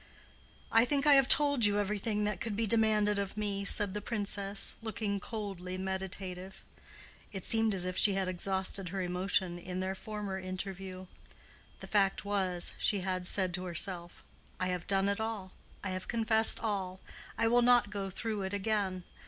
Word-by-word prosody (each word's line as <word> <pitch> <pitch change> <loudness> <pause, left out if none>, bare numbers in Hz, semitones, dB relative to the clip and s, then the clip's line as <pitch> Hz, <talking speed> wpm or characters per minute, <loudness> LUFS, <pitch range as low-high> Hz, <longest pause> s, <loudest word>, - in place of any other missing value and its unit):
"I 225 +1 +6
think 275 +3 +1
I 295 - +7
have 270 -2 +5
told 285 -4 +6
you 205 -1 +5
everything 210 +1 -1
that 210 -3 -3
could 225 -3 -3
be 225 +2 0
demanded 215 -2 +2
of 200 +1 -4
me," 200 -2 -2
said 200 0 +3
the 210 - -4
Princess, 200 -3 -1
looking 215 -2 -3
coldly 195 -4 -6
meditative. 190 0 -5 0.7
It 190 -3 -6
seemed 225 -2 +2
as 180 -1 -2
if 185 0 -4
she 205 - +5
had 190 -1 -1
exhausted 190 0 -2
her 190 +1 -3
emotion 180 0 -1
in 180 +1 -6
their 190 +1 -2
former 205 -1 -6
interview. 185 0 -7 0.8
The - - -7
fact 200 -1 +1
was, 190 -4 +1
she 200 -2 0
had 185 -1 -3
said 185 -2 +2
to 185 0 -4
herself, 175 0 0 0.4
"I 185 - 0
have 180 -1 -4
done 195 0 +1
it 200 +1 -1
all. 215 -4 -5 0.3
I 195 - -2
have 185 0 -5
confessed 220 -1 +4
all. 190 -4 -3 0.4
I 230 - +2
will 240 +1 +3
not 240 -3 +4
go 200 -2 -4
through 215 +2 -4
it 190 +1 -4
again. 200 -3 -2
195 Hz, 175 wpm, -31 LUFS, 185-215 Hz, 0.8 s, I